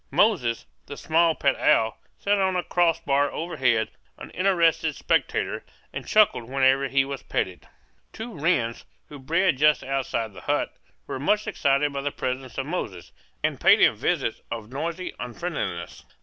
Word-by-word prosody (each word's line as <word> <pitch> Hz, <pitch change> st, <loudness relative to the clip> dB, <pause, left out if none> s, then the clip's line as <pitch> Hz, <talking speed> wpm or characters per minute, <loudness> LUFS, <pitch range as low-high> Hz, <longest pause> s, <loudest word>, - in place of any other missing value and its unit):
Moses, 135 Hz, -, +2 dB, 0.2 s
the 145 Hz, -, -8 dB
small 165 Hz, 0 st, +2 dB
pet 140 Hz, -1 st, +2 dB
owl, 110 Hz, 0 st, +3 dB, 0.2 s
sat 205 Hz, 0 st, +1 dB
on 190 Hz, -1 st, +1 dB
a 180 Hz, -, 0 dB
cross 170 Hz, -2 st, +2 dB
bar 140 Hz, -1 st, +1 dB
overhead, 130 Hz, -9 st, 0 dB, 0.3 s
an -, -, -10 dB
interested 170 Hz, -4 st, +2 dB
spectator, -, -, 0 dB, 0.3 s
and -, -, -6 dB
chuckled 210 Hz, -, +4 dB
whenever 135 Hz, +2 st, +2 dB
he 135 Hz, +1 st, +2 dB
was 140 Hz, -1 st, -5 dB
petted. 90 Hz, -1 st, -3 dB, 0.4 s
Two 225 Hz, +1 st, -7 dB
wrens, 140 Hz, -7 st, 0 dB, 0.3 s
who 145 Hz, -, -10 dB
bred 165 Hz, +2 st, +1 dB
just 150 Hz, 0 st, +4 dB
outside 130 Hz, -5 st, -2 dB
the -, -, -11 dB
hut, -, -, -1 dB, 0.3 s
were -, -, -5 dB
much 210 Hz, +10 st, +1 dB
excited 140 Hz, +1 st, +1 dB
by 140 Hz, -, -2 dB
the 145 Hz, -, -1 dB
presence 130 Hz, -1 st, -4 dB
of 135 Hz, -, -2 dB
Moses, 120 Hz, -, -5 dB, 0.3 s
and -, -, -1 dB
paid -, -, +6 dB
him -, -, +5 dB
visits -, -, -1 dB
of 115 Hz, -1 st, -6 dB
noisy 170 Hz, +6 st, -4 dB
unfriendliness. 120 Hz, -, -5 dB
140 Hz, 160 wpm, -25 LUFS, 130-170 Hz, 0.4 s, paid